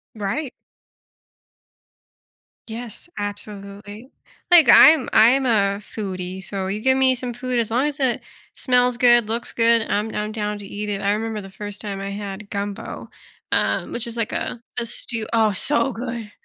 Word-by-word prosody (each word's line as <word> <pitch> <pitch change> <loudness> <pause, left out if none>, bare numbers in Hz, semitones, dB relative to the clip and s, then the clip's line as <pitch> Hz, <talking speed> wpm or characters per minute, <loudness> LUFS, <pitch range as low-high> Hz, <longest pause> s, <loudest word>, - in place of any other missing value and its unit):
Right. 225 +7 -3 2.2
Yes, 230 +7 -8
absolutely. 205 +2 -8 0.4
Like 330 -7 +8
I'm 310 -4 +7
I'm 250 +5 +5
a 200 -4 +2
foodie, 190 -3 -6
so 195 0 -4
you 205 +3 -3
give 260 +2 +3
me 260 -1 +4
some 250 -1 -4
food, 250 0 -2
as 225 -2 -1
long 250 +5 +1
as 295 0 -5
it 260 -3 0 0.3
smells 250 -1 +2
good, 240 -3 +5
looks 230 +1 -3
good, 230 -1 +4
I'm 215 +2 -2
I'm 210 0 -3
down 210 -1 -3
to 205 - -10
eat 210 +1 -5
it. 200 -1 -2
I 200 - +1
remember 215 0 -3
the 195 - -11
first 205 +1 -8
time 200 -2 -5
I 195 - -5
had 200 0 -7
gumbo, 200 0 -6 0.4
um, - - 0
which 240 0 0
is 235 0 -4
like 230 -2 -1
a 235 - -4 0.2
a 235 - -2
stew 230 -1 0
oh, 225 -2 +3
so 270 +6 +2
good. 235 -2 -6
220 Hz, 170 wpm, -21 LUFS, 205-245 Hz, 2.2 s, Like